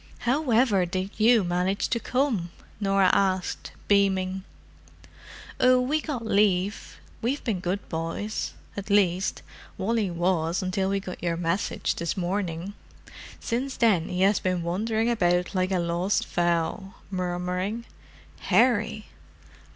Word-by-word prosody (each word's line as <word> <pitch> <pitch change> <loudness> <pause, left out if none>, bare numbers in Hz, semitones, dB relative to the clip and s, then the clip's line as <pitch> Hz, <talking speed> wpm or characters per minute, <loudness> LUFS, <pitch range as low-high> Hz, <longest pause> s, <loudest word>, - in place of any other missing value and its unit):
"However 245 -6 +2
did 185 +2 -3
you 225 0 +5
manage 180 +3 0
to 235 - 0
come?" 250 -9 0 0.3
Norah 195 -2 +3
asked, 190 -2 0 0.2
beaming. 190 -2 +2 1.2
"Oh, 255 0 +5
we 285 +5 0
got 265 -8 -4
leave. 200 -2 +1 0.2
We've 260 +5 -1
been 210 -6 -1
good 185 +3 -3
boys—at 195 +4 -5
least, 195 -2 +2 0.3
Wally 215 0 0
was 175 0 0
until 190 +1 0
we 195 0 +1
got 185 -2 -8
your 170 -1 -1
message 170 +3 -1
this 170 +1 -3
morning. 180 0 -2 0.7
Since 255 +3 -3
then 205 -9 +3
he 180 0 -2
has 195 +2 +4
been 185 -2 -1
wandering 220 +6 0
about 180 -6 +1
like 185 -1 +1
a 190 - +2
lost 175 +3 0
fowl, 175 +3 -1 0.2
murmuring, 180 +4 -2 0.5
'Harry! 215 0 +2
195 Hz, 120 wpm, -26 LUFS, 180-220 Hz, 1.2 s, you